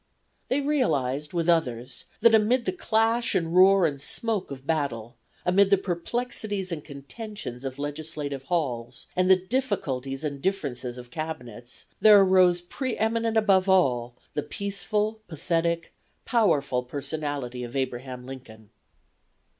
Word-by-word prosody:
They 275 Hz, +3 st, +1 dB
realized 150 Hz, -, 0 dB
with 170 Hz, -2 st, -1 dB
others 125 Hz, -7 st, 0 dB, 0.2 s
that 230 Hz, -, +6 dB
amid 230 Hz, +3 st, +3 dB
the 185 Hz, -, +1 dB
clash 225 Hz, +5 st, +1 dB
and 165 Hz, 0 st, 0 dB
roar 190 Hz, 0 st, +7 dB
and 140 Hz, -3 st, -2 dB
smoke 220 Hz, +5 st, 0 dB
of 135 Hz, -1 st, -8 dB
battle; 140 Hz, -8 st, -2 dB, 0.3 s
amid 190 Hz, +2 st, +4 dB
the 200 Hz, -, +5 dB
perplexities 200 Hz, +1 st, -3 dB
and 155 Hz, -3 st, -4 dB
contentions 140 Hz, -, -8 dB
of 135 Hz, -1 st, -5 dB
legislative 145 Hz, -1 st, -5 dB
halls, 135 Hz, -9 st, -2 dB
and 185 Hz, 0 st, +2 dB
the 190 Hz, -, +9 dB
difficulties 180 Hz, -, -2 dB
and 140 Hz, -2 st, -4 dB
differences 135 Hz, -10 st, -2 dB
of 125 Hz, 0 st, -11 dB
Cabinets, 125 Hz, -7 st, -7 dB
there 210 Hz, 0 st, +8 dB
arose 185 Hz, -2 st, +5 dB
pre 255 Hz, +8 st, -4 dB
eminent 225 Hz, +1 st, +1 dB
above 195 Hz, -3 st, +3 dB
all 125 Hz, -10 st, +2 dB, 0.2 s
the 150 Hz, -, -1 dB
peaceful, 200 Hz, +6 st, -2 dB
pathetic, 170 Hz, +1 st, -1 dB, 0.3 s
powerful 145 Hz, -, +2 dB
personality 140 Hz, -1 st, -4 dB
of 120 Hz, +1 st, -8 dB
Abraham 130 Hz, -1 st, -3 dB
Lincoln. 115 Hz, -5 st, -11 dB
165 Hz, 130 wpm, -26 LUFS, 135-200 Hz, 0.3 s, the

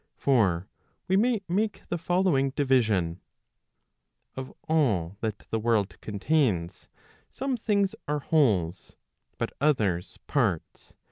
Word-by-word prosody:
For 100 Hz, -9 st, +2 dB, 0.4 s
we 190 Hz, -, +2 dB
may 225 Hz, +1 st, +3 dB
make 205 Hz, +5 st, -1 dB
the 175 Hz, -, -1 dB
following 175 Hz, -5 st, +2 dB
division: 110 Hz, -, +2 dB, 1.1 s
Of 130 Hz, 0 st, -6 dB, 0.2 s
all 105 Hz, -, +1 dB
that 110 Hz, -2 st, -3 dB
the 110 Hz, -, +1 dB
world 110 Hz, -3 st, 0 dB
contains, 105 Hz, -, 0 dB, 0.4 s
some 270 Hz, 0 st, -2 dB
things 205 Hz, -4 st, +1 dB
are 150 Hz, +1 st, 0 dB
wholes, 100 Hz, -, +1 dB, 0.4 s
but -, -, -2 dB
others 105 Hz, -, +1 dB
parts'. 110 Hz, -, -1 dB
130 Hz, 110 wpm, -27 LUFS, 100-165 Hz, 1.1 s, may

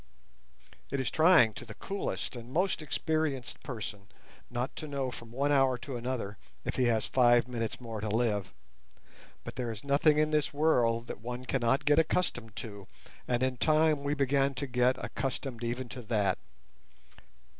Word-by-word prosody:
It 140 Hz, -, -1 dB
is 130 Hz, -, -1 dB
trying 160 Hz, -9 st, +6 dB
to -, -, -8 dB
the 110 Hz, -3 st, -10 dB
coolest 195 Hz, -7 st, -4 dB
and 120 Hz, +1 st, -9 dB
most 180 Hz, +3 st, +1 dB
experienced 150 Hz, -1 st, -2 dB
person 105 Hz, -5 st, -6 dB, 0.4 s
not 125 Hz, +1 st, -3 dB
to 155 Hz, -, -5 dB
know 135 Hz, -3 st, -2 dB
from 115 Hz, -2 st, -9 dB
one 140 Hz, +4 st, 0 dB
hour 135 Hz, -3 st, +4 dB
to 130 Hz, +2 st, -6 dB
another 120 Hz, -5 st, -3 dB, 0.3 s
if -, -, -2 dB
he 130 Hz, -, +3 dB
has 115 Hz, -2 st, +2 dB
five 120 Hz, -1 st, +4 dB
minutes 115 Hz, -3 st, -3 dB
more 115 Hz, -3 st, -6 dB
to 110 Hz, -, -2 dB
live, 105 Hz, -3 st, 0 dB, 0.9 s
but -, -, -8 dB
there 120 Hz, -2 st, -2 dB
is 110 Hz, -, -8 dB
nothing 145 Hz, +2 st, +4 dB
in 155 Hz, 0 st, +3 dB
this 150 Hz, -2 st, +1 dB
world 120 Hz, -7 st, +3 dB
that 105 Hz, -, -7 dB
one 125 Hz, +2 st, -5 dB
cannot 135 Hz, +2 st, +1 dB
get 150 Hz, +1 st, +5 dB
accustomed 120 Hz, -, 0 dB
to, 100 Hz, -4 st, -7 dB, 0.4 s
and 120 Hz, 0 st, +1 dB
in 130 Hz, -1 st, 0 dB
time 155 Hz, 0 st, +3 dB
we 145 Hz, +1 st, 0 dB
began 140 Hz, -1 st, +2 dB
to 140 Hz, -, -2 dB
get 125 Hz, 0 st, +2 dB
accustomed 130 Hz, -3 st, -4 dB
even 120 Hz, +2 st, -2 dB
to 125 Hz, -, -6 dB
that. 105 Hz, -5 st, +1 dB
125 Hz, 170 wpm, -31 LUFS, 115-140 Hz, 0.9 s, trying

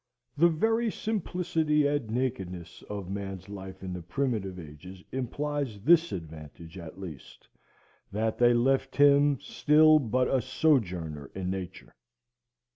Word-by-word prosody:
The 165 Hz, +4 st, +5 dB
very 225 Hz, +8 st, +1 dB
simplicity 165 Hz, -8 st, 0 dB
and 145 Hz, -5 st, 0 dB
nakedness 95 Hz, -8 st, -4 dB
of 100 Hz, -3 st, -5 dB
man's 95 Hz, -1 st, -6 dB
life 95 Hz, -1 st, -9 dB
in 95 Hz, -1 st, -4 dB
the 90 Hz, -, -5 dB
primitive 95 Hz, -1 st, -2 dB
ages 90 Hz, +4 st, -11 dB
imply 145 Hz, +3 st, -2 dB
this 145 Hz, +10 st, +3 dB
advantage 80 Hz, -1 st, -9 dB
at 85 Hz, -1 st, -9 dB
least, 80 Hz, -9 st, -10 dB, 0.6 s
that 110 Hz, +2 st, -1 dB
they 120 Hz, 0 st, +5 dB
left 135 Hz, +2 st, +1 dB
him 145 Hz, -1 st, +5 dB
still 155 Hz, +1 st, +4 dB
but 130 Hz, -1 st, +1 dB
a 130 Hz, -, +1 dB
sojourner 90 Hz, -, 0 dB
in 95 Hz, -1 st, -3 dB
nature. 95 Hz, -2 st, -7 dB
115 Hz, 125 wpm, -28 LUFS, 95-145 Hz, 0.6 s, The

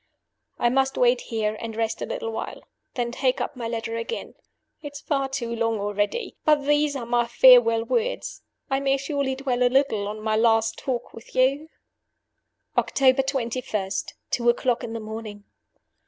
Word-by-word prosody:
"I 240 Hz, -, +2 dB
must 265 Hz, +1 st, +1 dB
wait 245 Hz, 0 st, +3 dB
here, 215 Hz, -2 st, -2 dB
and 225 Hz, -1 st, -6 dB
rest 225 Hz, 0 st, -2 dB
a -, -, -3 dB
little -, -, -4 dB
while -, -, -6 dB, 0.3 s
then 240 Hz, -1 st, -1 dB
take 255 Hz, +1 st, 0 dB
up -, -, -3 dB
my 240 Hz, -2 st, -4 dB
letter 230 Hz, 0 st, -3 dB
again. 230 Hz, -, -5 dB, 0.5 s
It 290 Hz, -2 st, -8 dB
is 285 Hz, -, -7 dB
far 275 Hz, -3 st, -1 dB
too 240 Hz, -4 st, -3 dB
long 230 Hz, -1 st, 0 dB
already. 205 Hz, -, -2 dB
But 300 Hz, -2 st, +3 dB
these 295 Hz, 0 st, +2 dB
are 250 Hz, -4 st, -4 dB
my 240 Hz, 0 st, +1 dB
farewell 240 Hz, -2 st, +6 dB
words. 480 Hz, -, -2 dB, 0.3 s
I 270 Hz, 0 st, 0 dB
may 275 Hz, 0 st, +2 dB
surely 275 Hz, -1 st, -2 dB
dwell 260 Hz, -2 st, -2 dB
a 250 Hz, -, +5 dB
little 250 Hz, -6 st, +1 dB
on 210 Hz, +1 st, -5 dB
my 215 Hz, 0 st, 0 dB
last 225 Hz, 0 st, +2 dB
talk 250 Hz, -3 st, -4 dB
with 225 Hz, -, -13 dB
you! 275 Hz, +5 st, +2 dB, 1.1 s
"October 265 Hz, -1 st, +3 dB
21. 235 Hz, -7 st, -2 dB, 0.4 s
Two 240 Hz, -1 st, +2 dB
o'clock 240 Hz, +1 st, +1 dB
in 230 Hz, -1 st, -5 dB
the 230 Hz, -, -4 dB
morning. 215 Hz, -1 st, -7 dB
245 Hz, 170 wpm, -24 LUFS, 225-270 Hz, 1.1 s, farewell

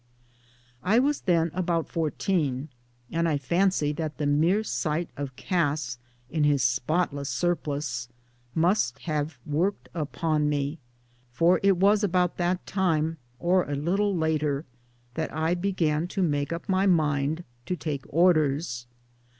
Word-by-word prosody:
I 205 Hz, +5 st, +3 dB
was 280 Hz, +3 st, +2 dB
then 170 Hz, -3 st, +2 dB
about 170 Hz, -2 st, 0 dB
fourteen, 155 Hz, -3 st, -1 dB, 0.4 s
and 170 Hz, 0 st, +1 dB
I 150 Hz, -, +1 dB
fancy 170 Hz, +2 st, +1 dB
that 155 Hz, 0 st, -4 dB
the 150 Hz, -, -1 dB
mere 165 Hz, +9 st, +3 dB
sight 165 Hz, -4 st, -2 dB
of 140 Hz, -2 st, -5 dB
Cass 145 Hz, -8 st, -1 dB, 0.3 s
m 160 Hz, -, +1 dB
his 145 Hz, -3 st, +3 dB
spotless 140 Hz, +3 st, 0 dB
surplice 140 Hz, -4 st, -1 dB, 0.5 s
must 165 Hz, -, +2 dB
have 150 Hz, -2 st, -2 dB
worked 170 Hz, +7 st, -1 dB
upon 155 Hz, -1 st, 0 dB
me, 145 Hz, +2 st, -1 dB, 0.5 s
for 165 Hz, +9 st, +3 dB
it 195 Hz, -2 st, +4 dB
was 205 Hz, +3 st, +4 dB
about 180 Hz, -2 st, +1 dB
that 180 Hz, +1 st, 0 dB
time 165 Hz, -4 st, 0 dB, 0.2 s
or 175 Hz, +2 st, +2 dB
a 145 Hz, -, -1 dB
little 190 Hz, +7 st, +1 dB
later 155 Hz, -2 st, 0 dB, 0.5 s
that 160 Hz, +4 st, -3 dB
I 160 Hz, +2 st, 0 dB
began 175 Hz, -4 st, 0 dB
to 190 Hz, +1 st, -1 dB
make 145 Hz, -3 st, 0 dB
up 170 Hz, +3 st, -4 dB
my 190 Hz, 0 st, +2 dB
mind 155 Hz, -2 st, +1 dB, 0.2 s
to 180 Hz, -, 0 dB
take 145 Hz, -6 st, -4 dB
Orders. 155 Hz, -6 st, +2 dB
160 Hz, 135 wpm, -27 LUFS, 145-180 Hz, 0.5 s, it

